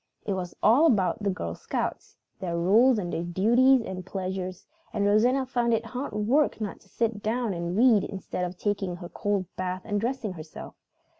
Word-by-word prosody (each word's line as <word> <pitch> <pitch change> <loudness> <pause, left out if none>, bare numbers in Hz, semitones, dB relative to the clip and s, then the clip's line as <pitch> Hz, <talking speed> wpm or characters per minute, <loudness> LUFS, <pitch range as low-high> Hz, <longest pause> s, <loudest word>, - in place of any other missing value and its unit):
It 200 - -1
was 180 -2 -4
all 250 +10 +6
about 210 - +2
the 200 - 0
Girl 85 - -3
Scouts, - - -4 0.2
and 185 - -5
their 170 - -1
rules 220 +9 +5
and 175 -4 -3 0.2
duties 245 +6 +5
and 185 -3 -6
pleasures, 185 -1 -4 0.3
and 205 -2 0
Rosanna 245 +6 +3
found 240 -2 +1
it 225 +1 -3
hard 250 +1 -5
work 235 +9 +2
not 210 -3 -4
to 195 - -24
sit 225 -1 -1
down 225 0 -1
and 170 +1 -3
read 230 -4 +5
instead 190 -2 -5
of 180 0 -4
taking 200 -3 -1
her 175 -1 -9
cold 205 -2 -1
bath 185 0 -3
and 205 -2 -1
dressing 235 -4 -2
herself. 155 -2 -9
205 Hz, 190 wpm, -27 LUFS, 185-235 Hz, 0.3 s, all